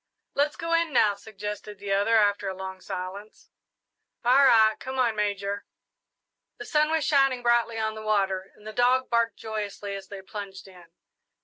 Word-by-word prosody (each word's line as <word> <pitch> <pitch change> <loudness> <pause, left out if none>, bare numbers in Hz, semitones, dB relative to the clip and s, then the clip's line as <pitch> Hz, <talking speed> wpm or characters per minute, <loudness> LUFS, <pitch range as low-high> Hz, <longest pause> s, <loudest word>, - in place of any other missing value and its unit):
"Let's 290 +2 +1
go 335 -1 -3
in 335 -1 +2
now," 215 -6 +4
suggested 210 0 -7
the 200 0 -5
other, 205 +3 +3
after 205 -2 +2
a 190 - -5
long 190 0 -7
silence. 190 +4 -7 0.7
"All 260 +3 +6
right 220 -3 +6
come 260 0 -6
on, 240 -4 +2
Major!" 200 -1 -2 0.9
The 425 - -8
sun 305 -6 +2
was 320 -1 +1
shining 270 -4 +3
brightly 235 -1 +2
on 220 0 -1
the 220 - -8
water, 195 -3 0
and 210 - -20
the 215 - -7
dog 250 +2 +2
barked 235 -1 +1
joyously 210 -2 -5
as 195 -1 -7
they 195 -1 -9
plunged 195 -1 -8
in. 180 -2 -15
215 Hz, 175 wpm, -26 LUFS, 200-245 Hz, 0.9 s, All